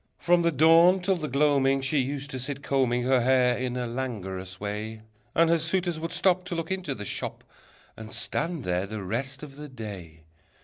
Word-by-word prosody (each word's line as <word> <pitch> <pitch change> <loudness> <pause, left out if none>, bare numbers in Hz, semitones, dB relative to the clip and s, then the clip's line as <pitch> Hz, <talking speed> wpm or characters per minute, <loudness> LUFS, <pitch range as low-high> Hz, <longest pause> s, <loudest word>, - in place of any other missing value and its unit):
From 175 0 +3
the 170 0 +2
dawn 165 +5 +6
till 190 +1 +1
the 155 -3 -3
gloaming 140 -1 +2
She 140 +2 +1
used 140 +2 -3
to 130 - -4
sit 140 +2 -4
combing 125 -3 +1
Her 130 0 +3
hair 125 0 +3
in 125 0 -3
a 125 - -2
languorous 95 -7 -5
way. 105 +2 -5 0.3
And 165 0 +5
her 170 - +4
suitors 170 +1 0
would 165 +1 -4
stop 185 -1 +2
To 180 - -4
look 165 +1 -4
into 180 -8 -2
the 105 - -7
shop, - - -4 0.5
And 110 -1 -9
stand 160 +5 -2
there 90 0 -1
the 105 -1 -5
rest 130 +8 -3
of 140 -2 -10
the 150 0 -8
day. 95 -10 -9
135 Hz, 195 wpm, -27 LUFS, 115-160 Hz, 0.5 s, dawn